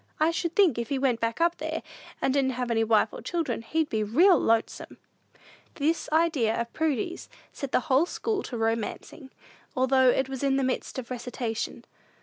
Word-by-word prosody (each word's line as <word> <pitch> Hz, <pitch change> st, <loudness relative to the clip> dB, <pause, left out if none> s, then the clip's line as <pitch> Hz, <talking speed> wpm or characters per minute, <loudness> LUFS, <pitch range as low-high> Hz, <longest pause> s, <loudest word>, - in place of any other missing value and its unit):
I 315 Hz, +2 st, +3 dB
should 335 Hz, 0 st, -3 dB
think, 350 Hz, -, +4 dB
if 235 Hz, -, -4 dB
he 275 Hz, -, 0 dB
went 260 Hz, -3 st, +1 dB
back 230 Hz, +4 st, -2 dB
up 340 Hz, +1 st, +2 dB
there, -, -, -4 dB, 0.4 s
and 265 Hz, -, +2 dB
didn't 270 Hz, -2 st, +1 dB
have 245 Hz, -1 st, -3 dB
any 225 Hz, -1 st, +2 dB
wife 220 Hz, -1 st, +2 dB
and -, -, -8 dB
children, 320 Hz, -10 st, -2 dB
he'd 315 Hz, +7 st, -1 dB
be 220 Hz, -5 st, -1 dB
real 330 Hz, -, +5 dB
lonesome!" 225 Hz, 0 st, -1 dB, 0.8 s
This 315 Hz, +3 st, 0 dB
idea 310 Hz, -9 st, +2 dB
of 235 Hz, 0 st, -4 dB
Prudy's 315 Hz, +1 st, -2 dB, 0.2 s
set 275 Hz, -2 st, -6 dB
the -, -, +2 dB
whole 290 Hz, +3 st, +2 dB
school 430 Hz, 0 st, -2 dB
to 245 Hz, -, -5 dB
romancing, 225 Hz, +5 st, -3 dB, 0.5 s
although 260 Hz, 0 st, +4 dB
it 265 Hz, +1 st, +2 dB
was 265 Hz, -1 st, -6 dB
in 275 Hz, -1 st, +2 dB
the 270 Hz, -, +1 dB
midst 255 Hz, +1 st, -2 dB
of 255 Hz, -1 st, -6 dB
a -, -, 0 dB
recitation. 240 Hz, -2 st, -4 dB
260 Hz, 190 wpm, -27 LUFS, 235-315 Hz, 0.8 s, real